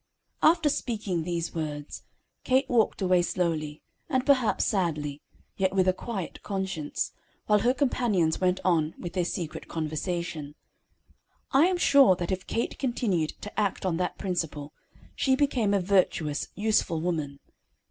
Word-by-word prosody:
After 325 -1 +4
speaking 210 - -1
these 170 -1 -2
words, 150 -2 -5 0.4
Kate 260 +2 +2
walked 225 -4 +2
away 180 -1 +4
slowly, 160 -4 -2 0.3
and 260 -4 +1
perhaps 255 -6 +3
sadly, 150 -8 -1 0.4
yet 190 0 +1
with 190 -1 +3
a 185 - +4
quiet 195 -3 -5
conscience, 190 -6 -3 0.3
while 210 -1 +4
her 240 +5 +3
companions 225 - +1
went 185 0 +2
on 160 -4 +2
with 175 -1 -6
their 180 -1 +1
secret 170 -2 -4
conversation. 155 -1 -3 1.0
I 285 +6 +5
am 370 -1 +1
sure 275 - +6
that 175 0 -4
if 185 -1 -3
Kate 230 - -2
continued 210 - 0
to 205 - -5
act 200 -2 -1
on 175 -3 0
that 180 - -2
principle, 165 -6 -3 0.4
she 265 -1 +2
became 260 -7 +1
a 200 - +3
virtuous, 180 -6 +1
useful 205 -6 +1
woman. 155 -5 -2
185 Hz, 145 wpm, -27 LUFS, 165-220 Hz, 1.0 s, sure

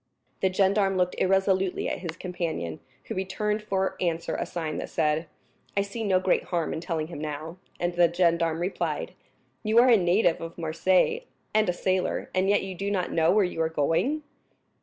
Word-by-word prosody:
The 190 - +2
gendarme 195 0 +2
looked 180 0 +1
irresolutely 190 0 +2
at - - -2
his 170 -2 -6
companion, 165 - -4 0.2
who - - -5
returned 210 +3 -1
for 190 -2 -1
answer 170 -2 -1
a - - -2
sign 160 -3 -3
that - - -5
said, 155 0 0 0.5
"I 200 - +4
see 200 +3 -5
no 190 -3 +3
great 185 0 +1
harm 170 -3 -1
in 160 - -4
telling 165 -3 -2
him 165 -1 -8
now," 155 +3 -5 0.2
and 175 0 0
the 175 -1 +4
gendarme 170 -2 +2
replied: 180 +3 -2 0.5
"You 215 +1 +1
are 245 +2 +7
a 235 - +7
native 175 -1 +2
of 165 0 -7
Marseilles, 185 - +1 0.3
and 215 -3 +3
a - - +2
sailor, 185 +1 -1
and 185 +1 +2
yet 205 -1 +3
you 190 0 -5
do 195 +3 -3
not 190 -3 -1
know 160 -1 +3
where 205 0 +4
you 180 -2 -3
are 160 - +1
going?" 165 - 0
180 Hz, 190 wpm, -27 LUFS, 165-195 Hz, 0.5 s, are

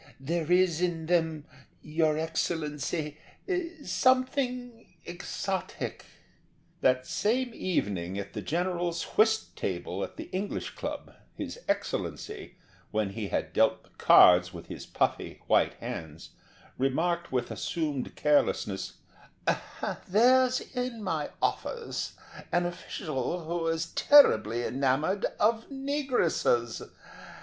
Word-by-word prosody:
"There 165 +4 -2
is 180 -2 +4
in 170 -3 0
them, 160 -3 +1 0.4
your 155 0 +1
Excellency, 155 -1 -2 0.7
something 250 -4 0
exotic." 180 +2 -4 0.8
That 130 0 +3
same 245 - 0
evening 100 - -1
at 100 0 -5
the 105 - -4
general's 175 - -1
whist 220 0 +3
table - - -3
at - - -7
the 320 - -4
English 195 +2 -3
Club, - - -6 0.2
his - - -6
Excellency, 415 -2 -3 0.3
when 105 -2 -1
he 105 0 -4
had - - -2
dealt - - +3
the - - -24
cards 90 0 +6
with 85 -2 -9
his - - -7
puffy - - -1
white - - +3
hands, 80 +1 -7 0.5
remarked 170 +6 0
with 125 -2 -1
assumed 150 -3 -3
carelessness: 145 -9 +1 1.1
"There's 255 +5 +4
in 250 -3 -4
my 160 -6 -1
office 470 -2 -2 0.4
an 175 0 +2
official 170 -2 -3
who 165 0 -2
is 165 0 0
terribly 120 - +6
enamoured 140 +10 +1
of 225 +1 +2
negresses. 265 - 0
170 Hz, 105 wpm, -29 LUFS, 135-215 Hz, 1.1 s, cards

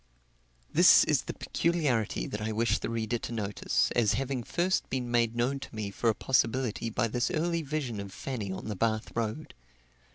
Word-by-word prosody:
This - - +8
is - - +2
the - - -4
peculiarity 145 -11 0
that 105 - -5
I 110 +1 -2
wish 115 +2 +1
the - - -4
reader 115 0 -1
to - - -6
notice, 105 -3 0
as 115 -3 +2
having 135 0 -1
first 180 +9 0
been 125 -2 -2
made 120 -1 +2
known 125 +4 0
to 130 - -10
me 105 -2 -3
for 115 +3 0
a 110 - +1
possibility 120 -2 0
by 115 +1 0
this 120 +2 0
early 170 0 0
vision 140 -7 -3
of 100 -1 -6
Fanny 110 -4 -4
on 95 - -6
the 110 - -3
Bath 110 +2 -1
road. 115 +6 -3
115 Hz, 190 wpm, -29 LUFS, 110-135 Hz, -, This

